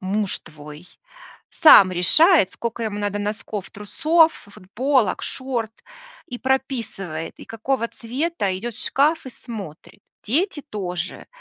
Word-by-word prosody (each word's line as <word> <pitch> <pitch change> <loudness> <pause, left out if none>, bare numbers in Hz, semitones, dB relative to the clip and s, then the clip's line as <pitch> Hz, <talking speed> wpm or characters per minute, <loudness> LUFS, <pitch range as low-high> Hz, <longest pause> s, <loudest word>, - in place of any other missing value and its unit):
муж 195 +1 -2
твой 150 +1 -12 0.6
сам 195 - +7
решает, 240 - +5
скока 230 0 -4
ему 210 -1 -3
надо 205 0 -2
носков, 205 -1 -5
трусов, 320 +9 +2
ф 200 - -18
футболок, 240 +4 0
шорт, 240 -4 -4 0.5
и 245 - -7
прописывает, 235 - -3
и - - -11
какого 230 +1 -2
цвета, 240 - -3
идет 235 +3 -5
в - - -5
шкаф 300 +2 +1
и 260 - -6
смотрит. 205 - -10 0.2
Дети 315 - 0
тоже. 180 -5 -5
225 Hz, 125 wpm, -22 LUFS, 195-265 Hz, 0.6 s, сам